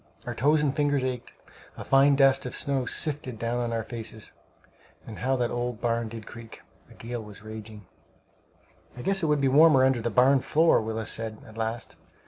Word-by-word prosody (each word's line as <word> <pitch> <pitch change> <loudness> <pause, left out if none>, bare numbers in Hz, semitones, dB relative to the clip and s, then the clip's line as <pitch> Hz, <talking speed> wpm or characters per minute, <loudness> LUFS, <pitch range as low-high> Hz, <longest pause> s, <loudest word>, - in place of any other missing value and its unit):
Our - - -4
toes 150 +3 +2
and 140 -2 0
fingers 145 -3 +1
ached. 125 -2 -4 0.5
A - - -6
fine 140 +1 +4
dust 135 -1 +3
of - - -5
snow 135 -3 0
sifted 145 -6 -1
down 115 +2 -2
on 120 -1 -2
our 115 -1 -2
faces; 110 -2 -6 0.7
and 110 - -9
how 130 +1 0
that 120 -2 -1
old 120 -2 -3
barn 115 -1 -1
did 110 -1 -8
creak! 115 -1 -12 0.3
A - - -16
gale 120 0 -6
was 105 -1 -12
raging. 110 -1 -10 1.1
"I 125 - -7
guess 195 0 +1
it 160 - 0
would 150 -1 +2
be 135 - +3
warmer 140 -1 +6
under 130 -3 +2
the 120 - -1
barn 130 +5 +4
floor," 160 +3 +3
Willis 110 0 -3
said, 110 -1 -4
at 110 - -14
last. 115 +1 -4
120 Hz, 195 wpm, -27 LUFS, 115-135 Hz, 1.1 s, warmer